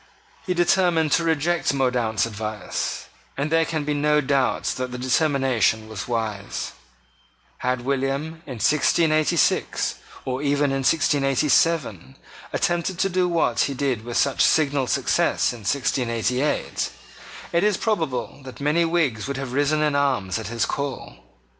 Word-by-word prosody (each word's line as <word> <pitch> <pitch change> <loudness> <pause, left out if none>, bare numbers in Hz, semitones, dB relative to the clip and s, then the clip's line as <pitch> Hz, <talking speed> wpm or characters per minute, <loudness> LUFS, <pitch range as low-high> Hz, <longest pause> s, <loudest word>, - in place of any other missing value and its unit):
He 180 - 0
determined 175 -3 +2
to 170 - +3
reject 165 -1 +1
Mordaunt's 120 -6 +1
advice; 110 -2 -4 0.3
and 145 +3 -2
there 165 0 +3
can 155 -2 -2
be 150 - 0
no 150 +1 +2
doubt 135 -2 +1
that 130 0 -3
the 125 - -5
determination 130 -5 +1
was 110 -2 -6
wise. 110 -4 -3 0.9
Had 125 -1 -1
William, 140 +5 -2
in 130 - -6
1686, 155 +4 +2 0.3
or 130 +1 -2
even 145 0 +1
in 135 - 0
1687, 135 - +1 0.3
attempted 175 +1 -1
to 195 - +1
do 180 0 +1
what 160 -9 +1
he 140 - -4
did 130 -5 -1
with 120 0 -3
such 140 -1 +2
signal 145 -4 +2
success - - +1
in 120 - -9
1688, 125 +3 -1 0.6
it 170 - +2
is 210 -2 +2
probable 160 - -2
that 130 -1 -10
many 150 +4 +2
Whigs 160 -10 0
would 140 -1 -3
have 135 -2 -5
risen 145 +2 +2
in 150 -1 +1
arms 125 -9 0
at 110 - -6
his 115 0 -1
call. 140 -3 -4
140 Hz, 140 wpm, -23 LUFS, 125-155 Hz, 0.9 s, to